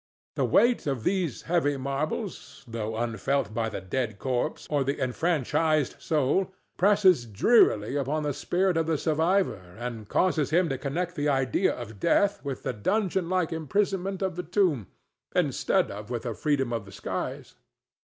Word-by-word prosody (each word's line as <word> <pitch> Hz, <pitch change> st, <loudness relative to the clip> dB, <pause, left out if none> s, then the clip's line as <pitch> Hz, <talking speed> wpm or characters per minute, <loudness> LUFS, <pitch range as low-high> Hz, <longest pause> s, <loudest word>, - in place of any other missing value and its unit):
The -, -, +1 dB
weight 240 Hz, -8 st, +3 dB
of 135 Hz, -5 st, -1 dB
these 180 Hz, -, -1 dB
heavy 160 Hz, -5 st, +1 dB
marbles, 140 Hz, -, -4 dB
though 110 Hz, -1 st, -4 dB
unfelt 115 Hz, +2 st, -1 dB
by 115 Hz, 0 st, -1 dB
the 105 Hz, -, -5 dB
dead 110 Hz, +3 st, -2 dB
corpse 125 Hz, 0 st, -2 dB
or 145 Hz, -2 st, +1 dB
the 140 Hz, +2 st, -2 dB
enfranchised 155 Hz, +1 st, +1 dB
soul, 155 Hz, +6 st, +1 dB, 0.2 s
presses 185 Hz, -, +4 dB
drearily 110 Hz, -, +3 dB
upon 145 Hz, +3 st, -1 dB
the 145 Hz, -1 st, -1 dB
spirit 180 Hz, +4 st, 0 dB
of 165 Hz, -1 st, +1 dB
the 160 Hz, -1 st, +1 dB
survivor 160 Hz, -, 0 dB
and 115 Hz, -3 st, -6 dB
causes 160 Hz, -6 st, +2 dB
him 170 Hz, +2 st, +3 dB
to 135 Hz, -2 st, -2 dB
connect 175 Hz, +6 st, -2 dB
the 145 Hz, -2 st, 0 dB
idea 135 Hz, -, +1 dB
of 110 Hz, -4 st, -8 dB
death 200 Hz, -, +2 dB
with 140 Hz, -3 st, -5 dB
the -, -, -2 dB
dungeon 185 Hz, -, 0 dB
like 180 Hz, -3 st, 0 dB
imprisonment 195 Hz, +4 st, -1 dB
of 190 Hz, -2 st, -1 dB
the -, -, -1 dB
tomb, 170 Hz, -, +1 dB, 0.5 s
instead -, -, +1 dB
of 105 Hz, +2 st, -8 dB
with 120 Hz, -2 st, -3 dB
the 120 Hz, -3 st, -3 dB
freedom 135 Hz, -1 st, 0 dB
of 115 Hz, -3 st, -3 dB
the 95 Hz, -, -12 dB
skies. -, -, -5 dB
145 Hz, 160 wpm, -27 LUFS, 120-180 Hz, 0.5 s, presses